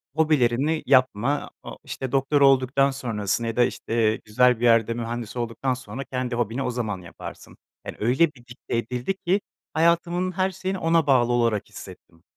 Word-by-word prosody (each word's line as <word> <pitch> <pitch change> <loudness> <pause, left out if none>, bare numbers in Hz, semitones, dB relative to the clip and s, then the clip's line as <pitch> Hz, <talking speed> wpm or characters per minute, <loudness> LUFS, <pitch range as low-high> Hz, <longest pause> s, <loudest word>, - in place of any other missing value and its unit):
hobilerini 155 -1 +2
yapma 130 +1 +2
a - - -8
o - - -10
işte 130 -2 -6
doktor 140 +1 +1
olduktan 135 0 +4
sonrasını 115 -4 -2
ya 115 - -3
da 125 - +4
işte 115 -2 0
güzel 125 +2 +3
bir 120 - 0
yerde 115 -1 +4
mühendis 120 -1 -5
olduktan 120 +2 -2
sonra 125 +1 -7
kendi 125 -2 -3
hobini 120 +3 -1
o 125 - -1
zaman 110 -6 -3
yaparsın. 85 - -11 0.3
Yani - - -7
öyle 130 +9 +3
bir 120 -2 -19
dikte 120 -1 -5
edildi 125 - -2
ki 195 +3 +3 0.3
hayatımın 170 +3 +1
her 185 +1 0
şeyini 190 +1 -4
ona 165 -3 +2
bağlı 120 -3 +4
olarak 115 -4 0
hissettim. 85 +1 -13
125 Hz, 170 wpm, -24 LUFS, 115-145 Hz, 0.3 s, olduktan